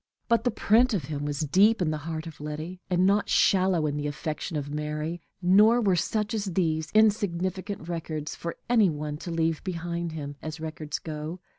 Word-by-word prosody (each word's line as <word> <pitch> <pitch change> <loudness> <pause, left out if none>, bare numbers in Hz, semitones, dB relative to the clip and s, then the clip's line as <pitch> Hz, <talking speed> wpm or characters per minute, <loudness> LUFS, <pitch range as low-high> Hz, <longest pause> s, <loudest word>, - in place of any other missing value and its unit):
But 235 0 +2
the - - +4
print 235 +1 +3
of 175 - -1
him 145 +1 -4
was 145 0 -2
deep 195 +9 +4
in 170 -4 +1
the 155 - -2
heart 160 0 -4
of 160 -3 -9
Letty, 155 +5 -6
and 180 0 +3
not 200 +2 +2
shallow 185 -4 +3
in 145 -1 -1
the 145 0 -2
affection 155 +2 -4
of 145 0 -4
Mary; 150 +3 -3 0.2
nor 210 +6 +6
were 200 -6 +3
such 210 +4 -1
as 215 -2 -1
these, 165 -4 0
insignificant 195 -3 +1
records 160 -3 -4
for 170 - -5
any 225 -5 +4
one 150 -1 -4
to 175 - -7
leave 165 -1 0
behind 170 -2 -3
him, 145 -2 -6
as 155 0 -6
records 155 -1 -4
go. 155 +2 -6
170 Hz, 190 wpm, -27 LUFS, 155-195 Hz, 0.2 s, nor